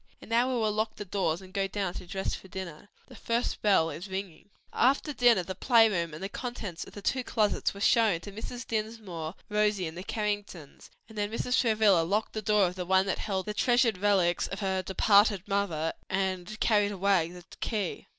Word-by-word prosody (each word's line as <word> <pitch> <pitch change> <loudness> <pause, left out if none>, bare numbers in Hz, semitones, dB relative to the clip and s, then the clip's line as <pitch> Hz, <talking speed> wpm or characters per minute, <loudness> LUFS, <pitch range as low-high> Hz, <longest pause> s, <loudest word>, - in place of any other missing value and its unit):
And - - -13
now 240 +3 +3
we - - 0
will 215 -1 +1
lock 215 +1 -1
the 205 - -7
doors 185 -2 -1
and 185 0 -14
go 195 -1 0
down 195 -2 -3
to 180 - -8
dress 190 +2 -3
for - - -7
dinner. 185 0 -8 0.2
The - - -14
first 235 +1 -2
bell 190 -6 +3
is 170 +7 -7
ringing." 190 -1 -6 0.2
After 280 +4 +2
dinner 240 -7 +4
the 185 - -5
play 225 +3 +5
room 170 -5 -1
and 155 +4 -8
the - - -1
contents 210 -6 -6
of - - -13
the 205 - -9
two 255 +4 0
closets 215 -4 0
were 200 - -9
shown 220 -6 +4
to 205 - -9
Mrs. 235 +4 -7
Dinsmore, 215 -7 -4
Rosie, 210 -2 +1
and 160 0 -6
the 180 - -6
Carringtons: 205 -8 -4 0.2
then 210 -2 -3
Mrs. 250 +2 0
Travilla 215 -6 +4
locked 200 +6 -1
the 215 - -3
door 210 -1 +3
of 180 - -2
the 180 -1 -5
one 190 0 +4
that 195 - -2
held 190 -3 -2
the 210 - -3
treasured 240 -3 +2
relics 190 -4 +2
of 195 - -6
her 190 -1 0
departed 200 +1 +3
mother, 190 -6 -1 0.2
and 190 +2 -2
carried 205 -2 +3
away 190 -4 +2
the 175 0 -12
key. 210 -6 -3
200 Hz, 210 wpm, -29 LUFS, 185-215 Hz, 0.2 s, play